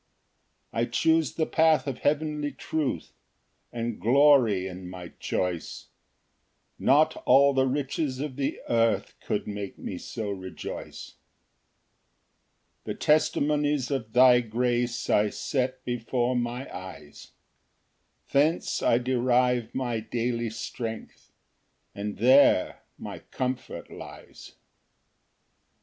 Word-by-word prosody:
2 - - -8
I 115 - +2
choose 160 +5 +1
the 160 - +1
path 160 -1 +3
of 135 -3 -4
heavenly 150 0 0
truth, 140 - -3 0.6
And 120 -1 -4
glory 120 -5 +4
in 90 -1 -7
my 90 -1 -8
choice: 90 -3 -3 0.9
Not 155 +3 +4
all 140 +2 +6
the 130 0 +2
riches 135 0 -2
of 145 -2 -4
the 135 0 -2
earth 115 -1 +1
Could 105 - -2
make 100 -2 -6
me 90 - -6
so 110 -4 -5
rejoice. 95 -2 -8 1.7
3 - - -3
The - - -15
testimonies 150 -2 +1
of 115 -5 -3
thy 125 -1 +7
grace 120 +1 -1
I 105 0 +3
set 130 +3 -2
before 120 +1 -1
my 120 +2 -2
eyes; 95 -5 -10 1.0
Thence 150 +5 +1
I 115 - +3
derive 125 -1 +1
my 120 -3 -1
daily 115 +1 -2
strength, 110 0 -7 0.6
And 100 0 -5
there 130 -3 +4 0.2
my - - -7
comfort 130 0 -4
lies. - - -11
Ver. - - -35
125 Hz, 110 wpm, -27 LUFS, 115-140 Hz, 1.7 s, thy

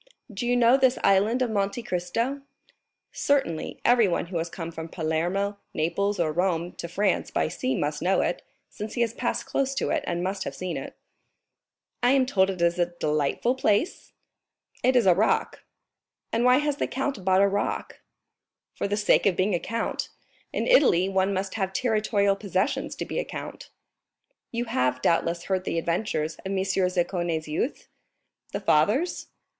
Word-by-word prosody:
"Do 225 +5 -3
you 245 0 +3
know 240 +2 +5
this 260 -1 +3
Island 210 +6 +3
of 240 - -1
Monte 200 +3 -1
Cristo?" 230 +10 -2 0.7
"Certainly, 270 - 0
everyone 230 -9 +3
who 170 -1 -3
has 165 +1 -3
come 170 -1 -6
from 160 0 -7
Palermo, 175 +6 -1 0.2
Naples, 200 +6 0
or 160 -2 +1
Rome 175 0 0
to - - -5
France 195 +3 0
by - - 0
sea 130 -4 -2
must 150 +2 -2
know 185 +3 +2
it, - - -1 0.3
since 210 +1 -7
he 240 - 0
has 230 -1 +1
passed - - -2
close 275 0 -1
to - - -1
it - - 0
and 175 0 -1
must 190 +1 -2
have - - -5
seen 185 -1 -4
it." - - -6 1.1
"I 245 +2 +4
am 270 -2 +4
told 195 -7 +2
it 180 -3 -2
is 170 +1 +2
a 175 - +3
delightful 150 - +1
place?" 260 - 0 0.7
"It 255 +1 +3
is 245 -4 +4
a 185 - +7
rock." 205 +5 0 0.7
"And 230 +2 +2
why 250 +1 +6
has 295 0 0
the - - -1
count 270 -6 -3
bought 190 +1 +4
a - - +5
rock?" 200 +1 -2 0.7
"For - - -2
the 205 +1 -1
sake 205 0 +3
of 190 - +2
being 190 +3 +1
a 175 - +1
count. 230 +5 -3 0.4
In - - -1
Italy 190 - +4
one 190 0 +1
must 190 0 -2
have 190 -3 -2
territorial 215 -4 +1
possessions 200 +3 -1
to - - -4
be - - -3
a - - 0
count." - - -8 0.8
"You 235 +1 -2
have, 125 - 0
doubtless, 170 0 +1
heard 190 -1 -1
the 170 - -2
adventures 165 -2 -1
of - - -8
M. 195 0 -2
Zaccone's 180 -3 0
youth?" 155 - -3 0.6
"The 200 - -3
father's?" 210 - +2
195 Hz, 175 wpm, -26 LUFS, 175-230 Hz, 1.1 s, a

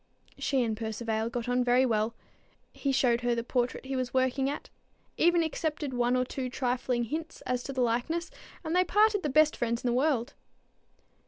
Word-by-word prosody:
She 270 -3 +1
and 225 -2 -1
Percivale 220 0 -2
got 240 0 -4
on 245 0 +2
very 250 +1 +4
well. 225 -1 0 0.6
He 275 - -1
showed 245 -3 +2
her 240 0 +1
the 235 - -2
portrait 245 +1 -1
he 270 0 -3
was 255 -1 0
still 260 - +1
working 260 +1 +1
at, 290 - -6 0.4
even 345 0 +4
accepted 310 -3 -2
one 245 0 +2
or 255 0 +1
two 255 0 -4
trifling 250 -1 -1
hints 315 +7 -5
as 250 -1 -2
to - - -4
the 260 -1 -1
likeness, 250 +9 0 0.3
and 320 +1 -2
they 365 - +5
parted 415 +3 +3
the 300 - -1
best 305 +2 +4
friends 235 0 -1
in - - 0
the 240 - +2
world. 265 -1 +1
255 Hz, 195 wpm, -29 LUFS, 240-295 Hz, 0.6 s, they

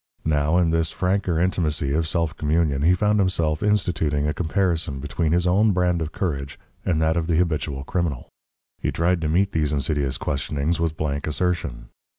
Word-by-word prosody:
Now, 75 +1 +2
in 85 -2 +3
this 80 0 +1
franker 90 -2 0
intimacy 80 -5 0
of 80 +1 +1
self 85 -1 -1
communion 75 -2 +1
he 85 +4 +4
found 105 +3 +2
himself 85 -5 +1
instituting 80 -8 +1
a 75 - 0
comparison 85 -5 -1
between 75 +3 -1
his 85 +1 +2
own 100 +4 +3
brand 90 -2 +1
of 80 0 -3
courage 70 -7 -3 0.3
and 85 -4 +1
that 80 0 +2
of 80 -1 -1
the 85 - +1
habitual 75 -5 -1
criminal. 80 -5 -2 0.5
He - - -1
tried 85 +1 +1
to 80 - -1
meet 95 +5 +2
these 75 -3 0
insidious 70 -2 -1
questionings 75 +4 -2
with 80 -2 -1
blank 70 -1 -2
assertion. 75 -7 -2
80 Hz, 175 wpm, -23 LUFS, 75-90 Hz, 0.5 s, he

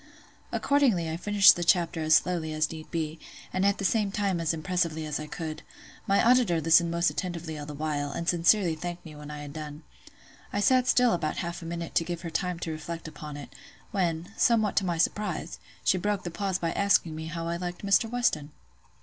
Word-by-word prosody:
Accordingly, 255 - +2
I - - -2
finished 200 +3 +6
the 175 - -2
chapter 170 -1 +2
as 155 0 +4
slowly 165 -3 +1
as 155 0 +1
need 160 -1 -9
be, 160 -1 -3 0.3
and 185 - 0
at 200 0 +3
the 195 - -3
same 210 -1 +1
time 195 -3 0
as 165 - +1
impressively 165 -1 -1
as 150 -1 -3
I 155 - -6
could; 155 0 -6 0.5
my 200 0 +3
auditor 240 -9 +4
listened 165 +2 +4
most 170 +1 +1
attentively 170 -3 -4
all 145 -1 -7
the 150 - -7
while, 145 -1 -2
and 170 +4 -5
sincerely 175 +1 +3
thanked 175 +2 -6
me 155 -2 -10
when 150 0 -10
I 150 0 -7
had 145 -1 -9
done. 150 0 -7 0.7
I 205 - -1
sat 255 +4 +3
still 245 -2 +4
about 155 -3 -2
half 170 0 -4
a - - -8
minute 170 0 -5
to - - +3
give 170 0 -5
her 170 - -5
time 180 +1 -1
to 165 - -3
reflect 165 +1 -6
upon 150 -1 -8
it; 145 - -10 0.4
when, 175 -1 -1
somewhat 220 -3 +3
to 195 - +3
my 170 -1 -1
surprise, 180 -1 -1 0.2
she 185 - +3
broke 205 +1 -1
the 175 - -5
pause 195 +1 -1
by 165 -2 -2
asking 195 -5 +2
me 160 0 -6
how 165 +1 -4
I 170 0 -2
liked 175 +2 -5
Mr. 200 +3 +3
Weston? 225 -12 0
170 Hz, 215 wpm, -28 LUFS, 155-195 Hz, 0.7 s, finished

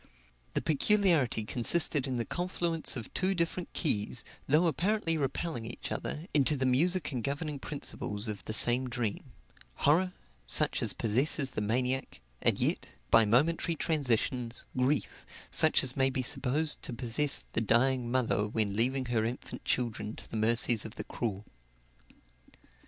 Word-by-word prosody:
The - - -2
peculiarity 160 - +2
consisted 135 +5 +3
in 130 - -3
the 120 -1 -2
confluence 175 -3 -1
of 120 -4 -8
two 190 +1 0
different 170 +1 -3
keys, 120 - 0 0.2
though 155 +5 +3
apparently 170 +2 0
repelling 145 -2 -3
each 120 - -7
other, 155 +2 -4
into 145 0 +3
the 130 - -1
music 160 +7 +1
and 125 -4 -4
governing 145 +2 -3
principles 110 -7 -5
of 105 -3 -4
the - - -5
same 120 +3 +6
dream; 120 -4 -3 0.5
horror, 180 +6 +2 0.3
such - - +2
as - - 0
possesses 130 +5 0
the 105 - -3
maniac, 125 +5 -2 0.2
and - - +3
yet, - - -2 0.2
by 115 - +6
momentary 160 +9 +2
transitions, 125 -6 -1
grief, 130 +3 -1 0.3
such - - +4
as 130 -1 +2
may 135 -1 +2
be 130 -1 -2
supposed 145 +4 0
to - - -5
possess 130 +4 +1
the - - 0
dying 120 +3 +1
mother 120 -4 0
when 105 -2 -1
leaving 130 +4 +1
her 120 -3 0
infant 120 +3 -6
children 115 -3 -1
to - - -10
the - - -9
mercies 115 +1 +3
of 110 - -9
the - - -6
cruel. 105 -3 -5
130 Hz, 150 wpm, -30 LUFS, 115-155 Hz, 0.5 s, same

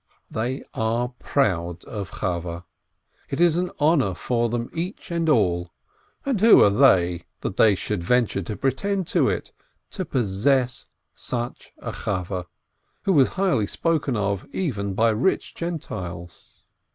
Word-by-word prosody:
They 120 +4 -2
are 115 +2 0
proud 90 - 0
of 100 -5 -5
Chaweh; 85 -3 -3 0.7
it 135 - -3
is 170 -2 +5
an 180 +1 0
honor 145 - +3
for 120 +3 0
them 120 0 -2
each 180 +3 -5
and 165 -1 0
all 85 - +2 0.5
(and 260 -8 0
who 225 +1 +8
are 100 - +5
they 90 -8 +4 0.2
that - - -4
they 105 -3 +6
should 105 0 -3
venture 115 +1 +1
to 105 +4 -5
pretend 185 +9 0
to - - +3
it?) - - -3 0.4
to - - -3
possess 125 +3 +1 0.3
such 120 -1 -4
a - - -5
Chaweh, 90 -1 -3 0.6
who 195 - +2
was 140 -5 +6
highly 185 - +2
spoken 150 -3 0
of 100 -2 -1
even 100 - -2
by 115 +2 +4
rich 115 - 0
Gentiles. 95 - -6
115 Hz, 140 wpm, -24 LUFS, 95-150 Hz, 0.7 s, who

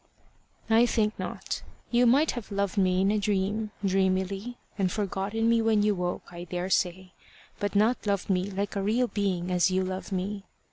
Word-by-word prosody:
"I 225 +2 +5
think 215 -2 +1
not. - - -4 0.3
You 245 0 +4
might 280 +6 +4
have 240 -4 -7
loved 200 0 -1
me 185 -2 +2
in 195 +1 +3
a 215 - +1
dream, 205 +2 0 0.2
dreamily, 195 +4 0 0.2
and 190 -3 0
forgotten 205 +2 -1
me 230 0 +4
when 220 -2 +3
you 210 0 +3
woke, 180 -2 -3
I 175 0 -7
daresay, 180 +1 -1 0.5
but 205 0 -2
not 220 +2 +2
loved 200 -2 0
me 190 0 0
like 200 +1 -3
a 200 - 0
real 225 +6 +2
being 190 -5 -1
as 180 +1 +3
you 185 0 +1
love 185 +2 -5
me. 195 +2 -3
200 Hz, 180 wpm, -28 LUFS, 185-215 Hz, 0.5 s, I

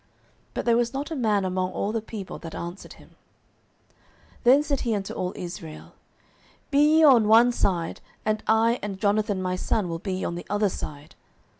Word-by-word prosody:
But - - -3
there 235 -1 +4
was 240 +2 0
not 285 +4 -4
a - - -2
man 210 -7 +1
among 185 0 -1
all 205 - -2
the 225 0 -2
people 210 -3 -7
that 165 -2 -8
answered 175 +3 -7
him. - - -18 1.3
09:014:040 - - -30
Then 270 +4 +6
said 285 -3 -1
he 230 -3 -1
unto 195 -1 -4
all 180 0 -3
Israel, 170 -3 -8 0.8
Be 280 - +3 0.2
ye 320 - +5
on 250 -8 +6
one 230 +3 +6
side, 175 -8 -1 0.2
and 215 0 0
I 225 +2 +3
and 200 -2 -5
Jonathan 205 -2 +1
my 185 0 -1
son 195 +1 -1
will 165 0 -4
be 185 0 -3
on - - -2
the 175 - -7
other 205 0 +1
side. 145 -4 -8
205 Hz, 190 wpm, -25 LUFS, 185-235 Hz, 1.3 s, Then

